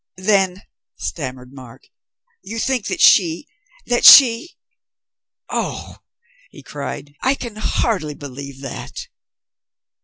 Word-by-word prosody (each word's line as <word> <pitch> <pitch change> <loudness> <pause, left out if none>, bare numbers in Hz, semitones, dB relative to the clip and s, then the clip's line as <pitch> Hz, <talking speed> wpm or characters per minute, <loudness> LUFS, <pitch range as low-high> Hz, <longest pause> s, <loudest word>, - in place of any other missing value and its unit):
"Then," 190 -1 0 0.3
stammered 130 -4 -7
Mark, 130 -4 -14 0.6
"you 225 - -8
think 245 0 -2
that - - -4
she 170 -4 +4 0.4
that 240 0 -1
she 250 +4 +7 0.9
Oh," - - -5 0.5
he - - -15
cried, 145 0 -8
"I 265 +2 +1
can 235 -5 -9
hardly 195 -8 -2
believe 140 -1 -10
that!" 135 - -8
175 Hz, 100 wpm, -19 LUFS, 140-230 Hz, 0.9 s, she